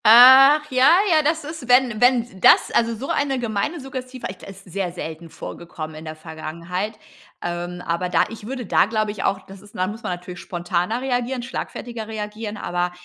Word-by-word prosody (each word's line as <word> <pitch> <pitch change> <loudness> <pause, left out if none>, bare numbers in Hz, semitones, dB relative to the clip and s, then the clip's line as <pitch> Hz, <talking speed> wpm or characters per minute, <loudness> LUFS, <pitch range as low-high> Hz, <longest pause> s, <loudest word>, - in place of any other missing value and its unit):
Ach 260 +6 +9
ja, 255 +1 +5 0.2
ja, 315 -1 +5
das 315 +1 0
ist, 305 -3 -8
wenn 245 -3 +4
wenn’s 245 -1 +3
das, - - +6
also 230 0 +1
so 255 +5 -7
eine 275 -2 0
gemeine 240 +7 -2
Suggestive 255 -1 -7
echt, 185 -1 -9
ist 195 0 -11
sehr 185 0 -3
selten 165 -1 -7
vorgekommen 160 -1 -8
in 155 +1 -9
der 155 0 -6
Vergangenheit. 170 +6 -5 0.5
Ähm, 175 +1 -4
aber 170 +2 -1
da 175 - +3
ich 220 -2 -9
würde 255 -1 -5
da, - - +4
glaube 215 -1 -1
ich, 205 - -6
auch, 195 0 -1
das 195 0 -13
ist 205 0 -18
da 185 - 0
muss 210 +4 -6
man - - -3
natürlich 180 0 -8
spontaner 180 +6 -2
reagieren, 250 -1 -2
schlagfertiger 235 -2 -6
reagieren, 215 0 -5
aber 175 -1 -2
215 Hz, 190 wpm, -22 LUFS, 180-250 Hz, 0.5 s, Ach